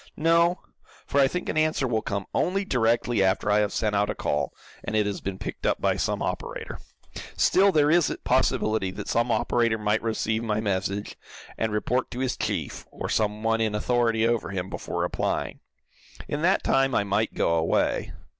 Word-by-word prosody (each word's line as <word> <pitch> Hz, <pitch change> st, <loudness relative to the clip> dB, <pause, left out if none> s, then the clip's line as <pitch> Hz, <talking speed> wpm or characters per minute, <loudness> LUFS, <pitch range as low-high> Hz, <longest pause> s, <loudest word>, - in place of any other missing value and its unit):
"No, 170 Hz, +2 st, +3 dB, 0.4 s
for 140 Hz, -, 0 dB
I 135 Hz, -, +5 dB
think 180 Hz, +6 st, -4 dB
an 155 Hz, -, 0 dB
answer 155 Hz, -4 st, +1 dB
will 110 Hz, -2 st, 0 dB
come 100 Hz, -2 st, -3 dB
only 195 Hz, +2 st, 0 dB
directly 120 Hz, -, +1 dB
after 95 Hz, +2 st, +1 dB
I 105 Hz, -, +4 dB
have 105 Hz, -1 st, +1 dB
sent 105 Hz, -2 st, 0 dB
out 105 Hz, +1 st, +1 dB
a -, -, -2 dB
call, 75 Hz, -2 st, -1 dB, 0.3 s
and -, -, -3 dB
it 105 Hz, -1 st, +3 dB
has 100 Hz, -1 st, -3 dB
been 95 Hz, -1 st, -4 dB
picked -, -, -7 dB
up -, -, +1 dB
by -, -, +1 dB
some -, -, -1 dB
operator. -, -, -5 dB, 0.6 s
Still 195 Hz, +1 st, +4 dB
there 150 Hz, -3 st, +3 dB
is 170 Hz, -2 st, +4 dB
a -, -, -4 dB
possibility 110 Hz, -3 st, +1 dB
that 95 Hz, -, -7 dB
some 120 Hz, +1 st, +1 dB
operator 115 Hz, -1 st, +1 dB
might 105 Hz, 0 st, 0 dB
receive 110 Hz, 0 st, -1 dB
my 110 Hz, -2 st, 0 dB
message, 100 Hz, -1 st, -2 dB, 0.4 s
and 110 Hz, -1 st, -1 dB
report 125 Hz, +4 st, 0 dB
to 125 Hz, -, -6 dB
his 130 Hz, -1 st, -1 dB
chief, -, -, -3 dB
or -, -, -6 dB
some 105 Hz, 0 st, 0 dB
one 115 Hz, 0 st, +1 dB
in 110 Hz, -1 st, 0 dB
authority 115 Hz, 0 st, +1 dB
over 120 Hz, -1 st, 0 dB
him, 95 Hz, -1 st, -4 dB
before -, -, -4 dB
replying. -, -, -2 dB, 0.7 s
In 145 Hz, -, -3 dB
that 185 Hz, +4 st, +2 dB
time 135 Hz, -1 st, +2 dB
I -, -, +3 dB
might 100 Hz, +2 st, -1 dB
go 85 Hz, -, +1 dB
away. 80 Hz, 0 st, +1 dB
110 Hz, 190 wpm, -26 LUFS, 105-130 Hz, 0.7 s, I